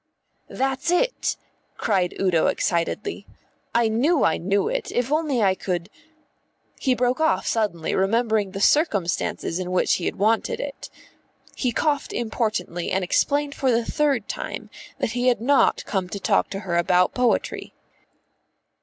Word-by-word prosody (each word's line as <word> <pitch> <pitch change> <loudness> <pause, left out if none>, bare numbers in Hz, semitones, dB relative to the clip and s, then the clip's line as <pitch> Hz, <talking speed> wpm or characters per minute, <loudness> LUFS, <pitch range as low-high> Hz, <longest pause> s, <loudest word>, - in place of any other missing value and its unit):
"That's 270 +3 -1
it," - - +1 0.4
cried 185 -4 0
Udo 180 -4 +2
excitedly. 170 - -1 0.5
"I 235 -1 +4
knew 270 +9 +2
I 160 - +3
knew 200 +3 0
it, - - -3
if 245 +2 -1
only 300 -7 +1
I 190 -2 +4
could 180 0 -4 0.4
" - - -36
He 260 -3 +2
broke 250 +2 +1
off 315 0 +2
suddenly, 200 -8 -1
remembering 215 +1 +1
the 195 +1 -6
circumstances 200 - +1
in 180 -1 -4
which 185 - +2
he 175 - -5
had - - -1
wanted 220 +3 +1
it. 280 -1 -6 0.7
He 250 - 0
coughed 290 +4 0
importantly 215 -7 -2
and 190 0 0
explained 285 +10 +1
for 265 - 0
the 235 -1 +2
third 280 -7 0
time - - -6 0.3
that - - -1
he 245 +1 0
had 245 -4 +3
not 270 +4 +3
come 190 -3 -2
to 200 - -5
talk - - +1
to 195 - -5
her 175 -4 -1
about 180 +1 +3
poetry. 250 -2 -1
225 Hz, 155 wpm, -23 LUFS, 185-265 Hz, 0.7 s, I